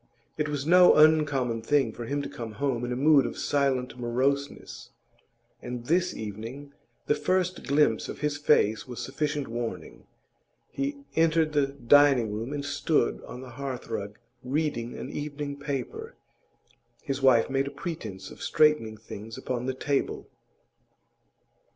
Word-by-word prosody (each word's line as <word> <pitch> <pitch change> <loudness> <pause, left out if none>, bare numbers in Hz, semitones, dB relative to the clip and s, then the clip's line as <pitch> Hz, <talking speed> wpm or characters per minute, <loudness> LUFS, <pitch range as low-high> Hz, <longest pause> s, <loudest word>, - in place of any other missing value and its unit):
It 150 -1 -1
was 145 -2 -3
no 180 +2 +7
uncommon 150 -7 +4
thing 130 -1 +1
for 120 - -7
him 140 +4 -2
to - - -4
come 115 -2 -7
home 125 +1 -1
in 120 - -3
a - - -1
mood 140 +1 +5
of - - -7
silent 135 -3 0
moroseness, 135 +4 -2 0.7
and 120 -1 -6
this 180 +4 +1
evening 115 +7 -7 0.3
the - - +3
first 180 +4 -1
glimpse 140 -6 +2
of - - -7
his 150 -1 0
face 120 -7 +2
was 125 -2 -7
sufficient 150 -2 -2
warning. 115 0 -6 0.6
He 280 0 -3
entered 160 -1 +3
the 145 -2 +3
dining 135 -3 +4
room 115 +5 -4
and 145 -1 -3
stood 145 -2 0
on 125 - -8
the 130 -1 -10
hearthrug 120 -6 -5 0.3
reading 130 -3 -2
an - - -6
evening 145 -1 -5
paper. 145 - -5 0.9
His 135 0 -3
wife 130 -4 +5
made 135 0 0
a - - -2
pretence 115 - -6
of - - -12
straightening 150 -8 +2
things 110 +1 -9
upon 125 0 -3
the 130 - -1
table. 140 +1 -1
140 Hz, 145 wpm, -27 LUFS, 120-150 Hz, 0.9 s, no